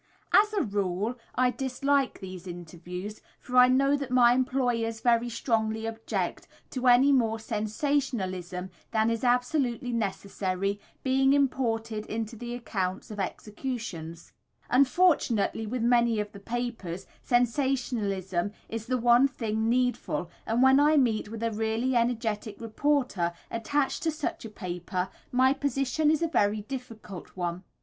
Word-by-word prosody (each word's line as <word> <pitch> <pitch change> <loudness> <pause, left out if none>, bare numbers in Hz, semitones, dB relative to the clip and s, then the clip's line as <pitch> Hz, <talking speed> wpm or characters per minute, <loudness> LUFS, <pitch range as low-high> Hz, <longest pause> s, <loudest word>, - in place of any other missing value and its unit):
As 420 +1 +6
a 405 - +2
rule 200 +1 -1 0.2
I 250 0 +3
dislike 270 +1 0
these 185 -1 -8
interviews, 175 +3 -7 0.2
for 250 - -7
I 250 0 +9
know 275 +2 +3
that 280 -2 -4
my 245 -1 +6
employers 245 -3 0
very 240 0 +2
strongly 220 -2 -1
object 225 0 -3 0.2
to 255 -1 -1
any 250 +3 +6
more 230 -5 +2
sensationalism 215 - -2 0.2
than 220 +1 +2
is 230 +1 -2
absolutely 250 0 +1
necessary 195 -2 -2 0.2
being 270 +1 +3
imported 230 -6 0
into 225 +1 -4
the 240 +2 -5
accounts 195 -5 -3
of 210 - -7
executions. 195 -6 -5 0.4
Unfortunately, 255 - +3
with 240 +1 -2
many 235 -2 +3
of 210 0 -3
the 200 - -11
papers, 225 -5 -4 0.2
sensationalism 230 -7 0 0.2
is 225 0 -5
the 255 0 +1
one 240 +2 +5
thing 225 -4 -2
needful, 245 -9 0 0.2
and 230 +3 +2
when 265 +1 +6
I 300 +1 +5
meet 225 -6 +2
with 225 +1 -6
a 230 - +1
really 225 +4 0
energetic 225 -3 -1
reporter 230 -6 0 0.2
attached 265 +5 0
to 330 - +1
such 305 -6 -3
a - - -6
paper 180 -1 -4 0.2
my 260 +1 +4
position 280 +2 0
is 315 +1 +2
a - - +2
very 210 -8 +1
difficult 220 -7 -8
one. 175 0 -3
230 Hz, 140 wpm, -28 LUFS, 205-255 Hz, 0.4 s, I